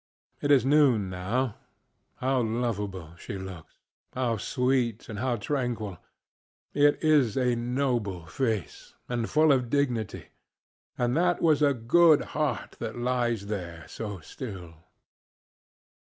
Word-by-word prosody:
It 145 Hz, -, -1 dB
is 140 Hz, -3 st, +5 dB
noon, 135 Hz, -9 st, +4 dB
now. 105 Hz, +7 st, -1 dB, 0.6 s
How 130 Hz, 0 st, +1 dB
lovable 105 Hz, -7 st, -3 dB
she 100 Hz, -, -6 dB
looks, 95 Hz, -4 st, -9 dB, 0.4 s
how 125 Hz, -3 st, 0 dB
sweet 125 Hz, 0 st, 0 dB
and 105 Hz, -2 st, -6 dB
how 125 Hz, 0 st, 0 dB
tranquil! 115 Hz, -, -3 dB, 0.7 s
It 145 Hz, 0 st, +4 dB
is 145 Hz, -8 st, +4 dB
a 125 Hz, -2 st, +2 dB
noble 120 Hz, -7 st, -1 dB
face, 110 Hz, +2 st, -3 dB
and 120 Hz, -2 st, -2 dB
full 155 Hz, 0 st, +4 dB
of 125 Hz, -3 st, +2 dB
dignity; 125 Hz, -7 st, -1 dB, 0.7 s
and 120 Hz, 0 st, +1 dB
that 175 Hz, +1 st, +2 dB
was 155 Hz, -3 st, +3 dB
a 140 Hz, -2 st, +4 dB
good 155 Hz, +7 st, +5 dB
heart 150 Hz, -1 st, -2 dB
that 115 Hz, 0 st, -5 dB
lies 120 Hz, -3 st, 0 dB
there 85 Hz, -6 st, -5 dB
so 105 Hz, -4 st, -6 dB
still. 95 Hz, -, -8 dB
120 Hz, 125 wpm, -28 LUFS, 105-135 Hz, 0.7 s, is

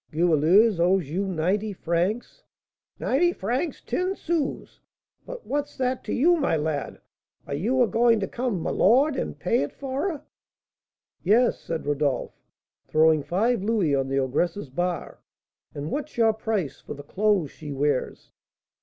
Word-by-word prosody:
"Goualeuse 175 Hz, +6 st, +4 dB
owes 175 Hz, -3 st, +2 dB
you 195 Hz, +4 st, -1 dB
ninety 190 Hz, +5 st, -1 dB
francs?" 180 Hz, +6 st, -2 dB, 0.6 s
"Ninety 345 Hz, +7 st, +2 dB
francs 255 Hz, -, -3 dB
ten 370 Hz, +2 st, -1 dB
sous; 330 Hz, -6 st, -3 dB, 0.5 s
but -, -, -8 dB
what's 290 Hz, +1 st, -3 dB
that 255 Hz, 0 st, -1 dB
to -, -, -4 dB
you, 345 Hz, +6 st, +4 dB
my 280 Hz, -, +1 dB
lad? 150 Hz, -2 st, -3 dB, 0.5 s
Are 140 Hz, -, -5 dB
you 235 Hz, -, +2 dB
a -, -, +2 dB
going 230 Hz, +2 st, +3 dB
to 195 Hz, -, -1 dB
come 240 Hz, -6 st, -2 dB
'my -, -, -2 dB
lord,' 265 Hz, +8 st, +4 dB
and -, -, -3 dB
pay 235 Hz, -, +1 dB
it 145 Hz, -, -2 dB
for 275 Hz, +6 st, -3 dB
her?" 310 Hz, -6 st, -6 dB, 1.0 s
"Yes," 230 Hz, +7 st, +3 dB
said 165 Hz, -3 st, -5 dB
Rodolph, 145 Hz, -2 st, -1 dB, 0.5 s
throwing 155 Hz, 0 st, +4 dB
five 210 Hz, -, 0 dB
louis 200 Hz, -7 st, +1 dB
on 135 Hz, -1 st, +1 dB
the 135 Hz, 0 st, -1 dB
ogress's 145 Hz, +4 st, -1 dB
bar, 175 Hz, +4 st, -3 dB, 0.6 s
"and 145 Hz, +2 st, -5 dB
what's 295 Hz, -2 st, -4 dB
your 225 Hz, -1 st, +4 dB
price 210 Hz, -, -3 dB
for -, -, -8 dB
the 145 Hz, -, -10 dB
clothes 190 Hz, -1 st, +1 dB
she 150 Hz, -2 st, -9 dB
wears?" 140 Hz, -1 st, -2 dB
195 Hz, 155 wpm, -25 LUFS, 155-250 Hz, 1.0 s, Goualeuse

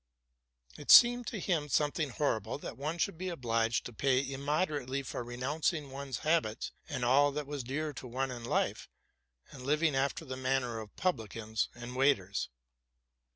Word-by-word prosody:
It 145 Hz, -, -10 dB
seemed 245 Hz, -1 st, +8 dB
to 215 Hz, -, -3 dB
him 165 Hz, -5 st, 0 dB
something 150 Hz, +1 st, +1 dB
horrible 125 Hz, -5 st, -1 dB
that -, -, -7 dB
one 155 Hz, +5 st, -3 dB
should 170 Hz, 0 st, -1 dB
be 185 Hz, 0 st, -2 dB
obliged 115 Hz, -7 st, 0 dB
to 120 Hz, -, -7 dB
pay 130 Hz, +2 st, +2 dB
im 135 Hz, 0 st, -5 dB
moderately 145 Hz, -3 st, 0 dB
for 125 Hz, -, -4 dB
renouncing 140 Hz, +5 st, -2 dB
one's 135 Hz, -1 st, -4 dB
habits 155 Hz, -9 st, +1 dB, 0.2 s
and 130 Hz, -5 st, -2 dB
all 140 Hz, +4 st, +5 dB
that 150 Hz, 0 st, -3 dB
was 145 Hz, -2 st, -4 dB
dear 150 Hz, +5 st, -3 dB
to 130 Hz, -, -8 dB
one 130 Hz, +2 st, -2 dB
in 120 Hz, -2 st, -7 dB
life, 115 Hz, -, -1 dB, 0.6 s
and 135 Hz, -, -10 dB
living 150 Hz, +2 st, +2 dB
after 140 Hz, +4 st, 0 dB
the 130 Hz, -2 st, -5 dB
manner 130 Hz, -3 st, 0 dB
of 110 Hz, -1 st, -10 dB
publicans 110 Hz, -, -1 dB
and 120 Hz, +1 st, -8 dB
waiters. 115 Hz, -8 st, +2 dB
135 Hz, 165 wpm, -32 LUFS, 125-150 Hz, 0.6 s, seemed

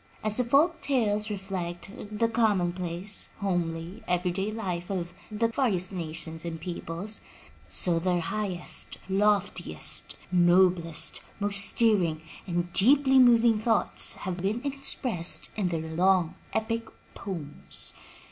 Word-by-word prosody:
As 215 Hz, 0 st, +2 dB
the 250 Hz, -, +3 dB
folk 290 Hz, +8 st, +3 dB
tales 220 Hz, -6 st, +1 dB
reflect 190 Hz, -3 st, -5 dB, 0.2 s
the 215 Hz, +2 st, +1 dB
commonplace, 190 Hz, -4 st, -1 dB
homely, 175 Hz, -2 st, -2 dB
every 180 Hz, 0 st, +1 dB
day 195 Hz, +4 st, -2 dB
life 180 Hz, -6 st, -4 dB
of 175 Hz, -3 st, -3 dB, 0.2 s
the 220 Hz, +2 st, +1 dB
various 210 Hz, -8 st, +1 dB
nations 165 Hz, -2 st, -5 dB
and 165 Hz, -1 st, -5 dB
peoples, 175 Hz, +4 st, -5 dB, 0.5 s
so 170 Hz, -2 st, +2 dB
their 180 Hz, 0 st, +1 dB
highest, 185 Hz, +1 st, -2 dB
loftiest, 200 Hz, -, +1 dB, 0.2 s
noblest, 175 Hz, -2 st, +3 dB, 0.2 s
most 200 Hz, -1 st, +3 dB
stirring 185 Hz, -9 st, +3 dB, 0.2 s
and 175 Hz, -1 st, -2 dB
deeply 265 Hz, +5 st, +5 dB
moving 235 Hz, -3 st, +5 dB
thoughts 220 Hz, -1 st, +2 dB
have 185 Hz, -2 st, -5 dB
been 215 Hz, +6 st, -1 dB
expressed 255 Hz, -9 st, -1 dB
in 205 Hz, -4 st, 0 dB
their 165 Hz, -2 st, -2 dB
long 175 Hz, +1 st, +2 dB, 0.2 s
epic 230 Hz, +1 st, -2 dB, 0.3 s
poems. 165 Hz, -7 st, -4 dB
190 Hz, 120 wpm, -28 LUFS, 175-215 Hz, 0.5 s, deeply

